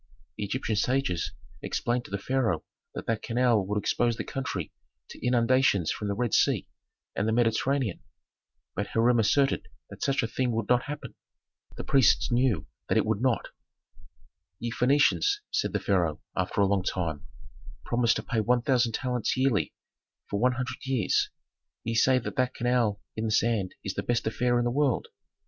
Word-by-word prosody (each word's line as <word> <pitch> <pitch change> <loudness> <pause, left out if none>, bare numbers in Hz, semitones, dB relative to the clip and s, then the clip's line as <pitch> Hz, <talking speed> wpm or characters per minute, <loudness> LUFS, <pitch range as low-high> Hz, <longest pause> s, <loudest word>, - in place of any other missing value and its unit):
The 105 - -3
Egyptian 110 +1 -2
sages 125 -9 0 0.3
explained 120 +1 -1
to - - -11
the 100 - -2
pharaoh 110 -6 0 0.3
that - - -5
that 115 -1 -1
canal 120 -3 +2
would 105 +1 -1
expose 120 +2 +1
the - - -3
country 100 - -4 0.4
to - - -11
inundations 125 -7 +3
from 105 - -4
the 100 - -1
Red 120 -1 -1
Sea - - +3 0.5
and 100 - 0
the - - +2
Mediterranean. 120 0 +1 0.7
But 100 0 -2
Hiram 115 +2 +3
asserted 135 +5 +2 0.2
that - - -11
such 135 -1 +1
a - - 0
thing 125 +1 -1
would 110 -2 -2
not 125 0 +3
happen; 145 0 -6 0.6
the - - -4
priests 130 -5 +3
knew 120 - +2 0.2
that - - +3
it - - +3
would 110 0 0
not. 130 -3 +1 1.1
"Ye 120 0 -3
Phœnicians," 145 - +3
said 430 - 0
the - - 0
pharaoh, 85 -6 +1 0.2
after - - 0
a - - +5
long 100 -1 +2
time, 85 -5 -3 0.6
"promise 120 -1 +2
to - - -3
pay 115 - -1
one 120 +2 +2
thousand 120 -3 +2
talents 125 -1 -1
yearly 130 -5 +2 0.6
for 100 - -2
one 125 +3 +3
hundred 130 +1 -4
years. 130 -8 +1 0.5
Ye 115 - -2
say 130 +3 +4
that 125 - -4
that 125 0 +1
canal 120 -3 +2
dug 100 - -21 0.2
in 110 - -1
the 110 - -1
sand 110 -4 +1
is 95 - -2
the 100 - -2
best 120 +4 -1
affair 120 +2 +1
in 120 - +1
the 120 - +1
world. 140 -1 +1
120 Hz, 180 wpm, -28 LUFS, 105-125 Hz, 1.1 s, a